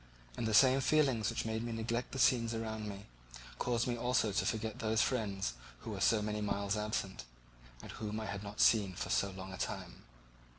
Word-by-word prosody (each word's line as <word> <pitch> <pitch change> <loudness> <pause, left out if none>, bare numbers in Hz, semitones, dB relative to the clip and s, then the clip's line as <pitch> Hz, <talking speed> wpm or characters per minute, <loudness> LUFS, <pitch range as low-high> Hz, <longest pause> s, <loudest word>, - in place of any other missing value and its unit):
And 115 - -2
the 110 - 0
same 130 +2 +6
feelings 130 -6 +3
which - - -2
made 110 0 -1
me 120 0 -4
neglect 115 +2 -2
the - - -5
scenes 115 -2 +3
around 110 -1 -4
me 100 0 -8 0.5
caused 120 -1 +1
me 120 - -1
also 120 -2 +1
to 100 - 0
forget 110 -1 -2
those 110 0 +2
friends 100 - -1 0.3
who - - -6
were - - -5
so 110 -2 +4
many 105 0 -2
miles 100 0 -1
absent, 105 -2 -2 0.6
and - - -8
whom 105 0 -4
I 110 - -4
had 100 -1 -4
not 105 0 -8
seen 100 -5 +4
for - - -4
so 100 - +2
long 95 0 -8
a - - -6
time. - - -4
110 Hz, 205 wpm, -34 LUFS, 100-115 Hz, 0.6 s, same